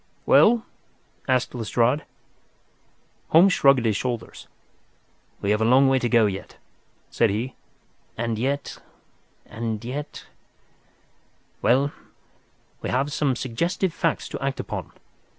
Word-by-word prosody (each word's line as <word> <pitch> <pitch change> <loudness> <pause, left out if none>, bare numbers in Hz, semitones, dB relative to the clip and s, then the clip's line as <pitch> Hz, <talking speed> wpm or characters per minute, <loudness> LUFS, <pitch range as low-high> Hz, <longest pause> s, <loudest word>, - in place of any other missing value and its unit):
"Well?" 230 0 +5 0.6
asked 130 -1 +1
Lestrade. 120 +4 0 1.2
Holmes 180 +4 +6
shrugged 135 -3 +4
his 110 -2 +2
shoulders. 120 +1 -4 0.9
"We 100 - 0
have 105 +1 +1
a - - +3
long 130 +3 +5
way 135 0 +3
to 120 - -1
go 115 -2 +4
yet," 95 -1 -5 0.5
said 115 - +2
he. 115 +6 -3 0.6
"And 115 -1 -2
yet—and 115 -4 -6
yet—well, 140 0 -5 0.9
we - - -4
have 140 +3 0
some 145 -4 +1
suggestive 165 +9 -2
facts 165 -1 -1
to - - -6
act 135 0 -2
upon. - - -5
125 Hz, 110 wpm, -24 LUFS, 115-140 Hz, 1.2 s, Holmes